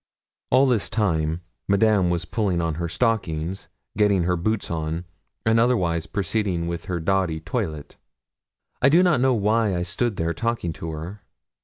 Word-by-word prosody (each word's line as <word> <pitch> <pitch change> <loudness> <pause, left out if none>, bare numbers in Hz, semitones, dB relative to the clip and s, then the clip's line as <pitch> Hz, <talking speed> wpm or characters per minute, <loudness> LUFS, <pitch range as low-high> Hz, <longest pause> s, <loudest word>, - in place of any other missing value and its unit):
All 130 +2 +5
this 120 -6 +1
time 80 -6 0 0.3
Madame 100 -2 +3
was 85 -1 -1
pulling 95 -1 0
on 85 -1 0
her 85 - -1
stockings, 90 -4 -1 0.3
getting 100 -3 +3
her 90 +1 +1
boots 105 +4 -1
on, 80 +1 -3 0.4
and 110 +1 +4
otherwise 90 -9 +1
proceeding 100 -4 -1
with 85 0 -4
her 90 -4 -2
dowdy 90 -2 0
toilet. 80 - -4 0.8
I 140 - +6
do 170 +5 +5
not 170 -9 +3
know 130 -1 +3
why 105 -1 +2
I 85 - -1
stood 105 +6 -1
there 85 -1 -1
talking 115 -4 -2
to 80 - -6
her. 80 +6 -7
95 Hz, 160 wpm, -24 LUFS, 85-110 Hz, 0.8 s, I